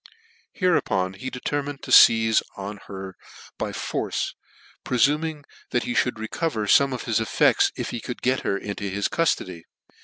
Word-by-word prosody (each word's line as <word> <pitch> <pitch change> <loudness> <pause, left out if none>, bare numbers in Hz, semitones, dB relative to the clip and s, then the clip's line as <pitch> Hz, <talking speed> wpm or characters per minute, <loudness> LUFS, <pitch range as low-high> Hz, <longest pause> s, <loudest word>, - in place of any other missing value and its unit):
Hereupon 95 - +1
he 115 +8 -6
determined 140 +2 -4
to - - -7
feize 110 -1 +7 0.2
on 100 +1 -6
her 95 -1 -8 0.4
by - - -2
force, - - -3 0.5
prefuming 150 +4 +1 0.3
that 120 - 0
he 120 - -3
mould 125 -1 +1
recover 110 +1 -2
fome 140 +6 +4
of 125 - -4
his 115 -2 0
effects 110 -2 +3
if - - -4
he 120 - -4
could 125 - -7
get 130 +1 +2
her 100 - -1
into 100 0 -5
his 100 +1 -1
cuftody. 95 - -1
115 Hz, 155 wpm, -24 LUFS, 100-140 Hz, 0.5 s, feize